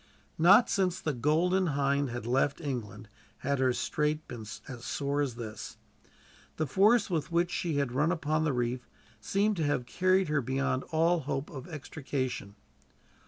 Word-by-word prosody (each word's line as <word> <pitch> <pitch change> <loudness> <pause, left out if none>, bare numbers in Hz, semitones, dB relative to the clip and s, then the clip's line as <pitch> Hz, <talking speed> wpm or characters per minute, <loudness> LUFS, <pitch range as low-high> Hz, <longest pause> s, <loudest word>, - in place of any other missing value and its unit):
Not 195 +8 +7
since 185 -3 +1
the 155 - -2
Golden 170 +8 +2
Hind 140 0 +1
had 120 -1 -5
left 135 +3 +1
England 120 -8 -5 0.4
had 140 0 +1
her 130 -1 +3
strait 150 +4 -1
been 115 -5 -8 0.2
as 120 -4 -8
sore 140 +2 -1
as 135 -5 -1
this. 110 -3 -7 0.8
The 155 - +1
force 210 - +4
with 165 0 -1
which 170 +1 +1
she 170 -3 -1
had 140 -4 0
run 150 +6 +2
upon 155 -2 0
the 155 - +1
reef 125 0 -2 0.3
seemed 200 - +1
to 165 - 0
have 145 -4 0
carried 185 +5 +2
her 150 -1 +1
beyond 130 +1 -1
all 165 +2 +2
hope 135 -1 -3
of 135 +2 -8
extrication. 135 - -4
145 Hz, 165 wpm, -30 LUFS, 130-170 Hz, 0.8 s, Not